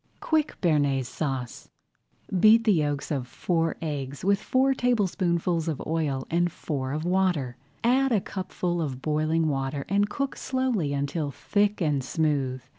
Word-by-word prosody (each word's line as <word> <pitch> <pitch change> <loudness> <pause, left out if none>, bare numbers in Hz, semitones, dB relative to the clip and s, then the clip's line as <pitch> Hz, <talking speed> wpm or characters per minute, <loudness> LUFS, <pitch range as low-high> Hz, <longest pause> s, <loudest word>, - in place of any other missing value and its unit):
QUICK 310 -2 0
BEARNAISE 145 - +2
SAUCE 130 -4 -4 0.7
Beat 220 +4 +7
the 215 -2 +4
yolks 145 -3 -1
of 135 -4 -2
four 165 +3 -1
eggs 140 -1 -4
with 200 +1 +3
four 265 +1 +2
tablespoonfuls 180 -9 0
of 155 -4 -2
oil 150 -5 -1
and 175 +1 +2
four 135 -5 -4
of 155 +3 -3
water. 175 -9 +1 0.3
Add 260 +3 +3
a 220 - +4
cupful 185 -2 -3
of 130 -4 -4
boiling 155 +1 +1
water 135 -1 -2
and 205 +1 +2
cook 275 +5 -2
slowly 255 - -1
until 145 +2 -1
thick 205 +7 0
and 145 -5 +1
smooth. 135 -3 -1
160 Hz, 145 wpm, -26 LUFS, 140-200 Hz, 0.7 s, Beat